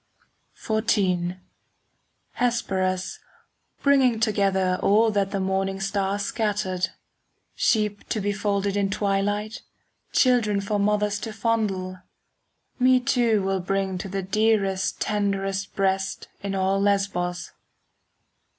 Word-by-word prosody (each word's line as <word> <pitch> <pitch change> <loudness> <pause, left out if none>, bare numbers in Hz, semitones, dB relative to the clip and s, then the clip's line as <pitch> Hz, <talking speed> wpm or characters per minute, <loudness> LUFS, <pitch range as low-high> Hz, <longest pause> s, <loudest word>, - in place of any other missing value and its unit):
XIV 185 -5 0 1.0
Hesperus, 190 -6 0 0.6
bringing 265 -5 +4
together 195 -4 +1
All 220 +3 +4
that 200 -2 0
the 195 - -2
morning 190 0 -1
star 195 0 -1
scattered,— 200 -3 -1 0.6
Sheep 210 -2 0
to 220 - 0
be 205 0 -1
folded 200 -1 -1
in 200 -1 +1
twilight, 205 +2 -1 0.5
Children 235 -6 +3
for 205 +1 -1
mothers 210 0 +1
to 220 +1 -5
fondle,— 210 -5 -1 0.8
Me 255 0 +5
too 235 -4 +2
will 195 0 0
bring 190 0 -1
to 195 - -5
the 195 0 -3
dearest, 195 -1 +1
5 - - -27
Tenderest 195 -2 -1
breast 190 -1 -1
in 200 -1 -3
all 195 +1 +1
Lesbos. 195 -3 0
200 Hz, 110 wpm, -25 LUFS, 190-215 Hz, 1.0 s, Me